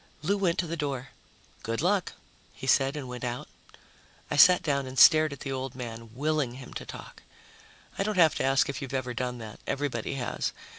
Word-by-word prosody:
Lou 195 Hz, +6 st, +2 dB
went 185 Hz, -4 st, +1 dB
to 180 Hz, -, 0 dB
the 165 Hz, 0 st, -4 dB
door. 140 Hz, -5 st, -3 dB, 0.5 s
"Good 115 Hz, +1 st, -3 dB
luck," 185 Hz, +3 st, +1 dB, 0.4 s
he -, -, -8 dB
said, 135 Hz, +1 st, +3 dB
and 140 Hz, -3 st, -5 dB
went 125 Hz, 0 st, -7 dB
out. 125 Hz, 0 st, -4 dB, 0.8 s
I -, -, 0 dB
sat 180 Hz, +4 st, +7 dB
down 140 Hz, -3 st, 0 dB
and 130 Hz, +1 st, -8 dB
stared 155 Hz, 0 st, +7 dB
at 140 Hz, -, -9 dB
the 135 Hz, -, -4 dB
old 130 Hz, -1 st, -4 dB
man, 115 Hz, -2 st, -7 dB
willing 150 Hz, -2 st, 0 dB
him 130 Hz, -1 st, -10 dB
to -, -, -7 dB
talk. -, -, -10 dB, 0.8 s
I -, -, +2 dB
don't 210 Hz, 0 st, -1 dB
have 160 Hz, -4 st, +6 dB
to -, -, -1 dB
ask 135 Hz, 0 st, +3 dB
if 140 Hz, 0 st, -4 dB
you've 135 Hz, -1 st, -5 dB
ever 125 Hz, -2 st, -2 dB
done 125 Hz, 0 st, -3 dB
that; 110 Hz, -2 st, -9 dB
everybody 140 Hz, -3 st, -2 dB
has. 125 Hz, -3 st, -2 dB
135 Hz, 205 wpm, -28 LUFS, 125-155 Hz, 0.8 s, sat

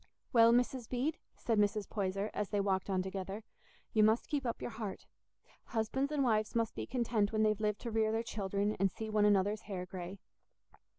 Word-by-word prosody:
"Well, 230 Hz, -1 st, +7 dB
Mrs. 245 Hz, 0 st, +1 dB
Bede," 270 Hz, +6 st, -1 dB, 0.2 s
said 225 Hz, -3 st, +1 dB
Mrs. 205 Hz, 0 st, +1 dB
Poyser, 195 Hz, 0 st, -2 dB
as 210 Hz, -2 st, -2 dB
they 205 Hz, -, 0 dB
walked 195 Hz, -1 st, 0 dB
on 185 Hz, -1 st, +1 dB
together, 195 Hz, +2 st, -5 dB, 0.5 s
"you 215 Hz, -, +5 dB
must 220 Hz, +2 st, +4 dB
keep 280 Hz, -4 st, -1 dB
up 235 Hz, -, -2 dB
your -, -, -4 dB
heart; 220 Hz, -3 st, -6 dB, 0.6 s
husbands 265 Hz, +5 st, -1 dB
and 290 Hz, -2 st, +1 dB
wives 215 Hz, -3 st, +1 dB
must 230 Hz, -1 st, +1 dB
be -, -, -5 dB
content 230 Hz, -5 st, +1 dB
when 215 Hz, -1 st, +2 dB
they've 215 Hz, -1 st, +2 dB
lived 210 Hz, -1 st, 0 dB
to 235 Hz, -, -4 dB
rear 220 Hz, 0 st, +2 dB
their 225 Hz, +1 st, 0 dB
children 205 Hz, -1 st, -1 dB
and 195 Hz, 0 st, +3 dB
see 220 Hz, +4 st, -6 dB
one 210 Hz, -1 st, +4 dB
another's 205 Hz, +1 st, +3 dB
hair 185 Hz, -2 st, -3 dB
grey." 180 Hz, +1 st, -7 dB
215 Hz, 195 wpm, -34 LUFS, 200-230 Hz, 0.6 s, Well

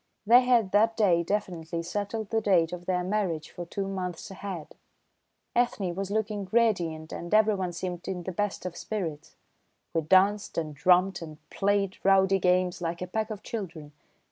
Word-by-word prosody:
They 240 Hz, +4 st, +8 dB
had 240 Hz, -6 st, +3 dB
that 220 Hz, +2 st, +3 dB
day 185 Hz, -6 st, +4 dB
definitely 170 Hz, -3 st, -3 dB
settled 205 Hz, +4 st, -4 dB
the 225 Hz, -1 st, +2 dB
date 180 Hz, -5 st, +3 dB
of 175 Hz, 0 st, -7 dB
their 180 Hz, -1 st, +1 dB
marriage 180 Hz, -5 st, -2 dB
for 175 Hz, -1 st, -7 dB
two 195 Hz, +2 st, -3 dB
months 185 Hz, -2 st, -5 dB
ahead; 190 Hz, -4 st, -7 dB, 0.8 s
Ethne 215 Hz, -7 st, +1 dB
was 195 Hz, +2 st, -4 dB
looking 210 Hz, -1 st, -2 dB
radiant 175 Hz, -9 st, +1 dB
and 170 Hz, -, -6 dB
everyone 205 Hz, -4 st, +3 dB
seemed 175 Hz, 0 st, -5 dB
in 180 Hz, -2 st, -3 dB
the 185 Hz, -, -4 dB
best 205 Hz, +1 st, -2 dB
of 180 Hz, -2 st, -4 dB
spirits. 170 Hz, -9 st, -5 dB, 0.6 s
We 165 Hz, -, +2 dB
danced 190 Hz, +5 st, +3 dB
and 155 Hz, -4 st, -4 dB
romped 185 Hz, 0 st, +4 dB
and 155 Hz, -2 st, -8 dB
played 200 Hz, -1 st, 0 dB
rowdy 195 Hz, 0 st, +4 dB
games 180 Hz, 0 st, +2 dB
like 170 Hz, +1 st, -3 dB
a -, -, -2 dB
pack 215 Hz, +4 st, -2 dB
of 210 Hz, -1 st, -6 dB
children. 175 Hz, -9 st, -6 dB
190 Hz, 170 wpm, -28 LUFS, 175-205 Hz, 0.8 s, They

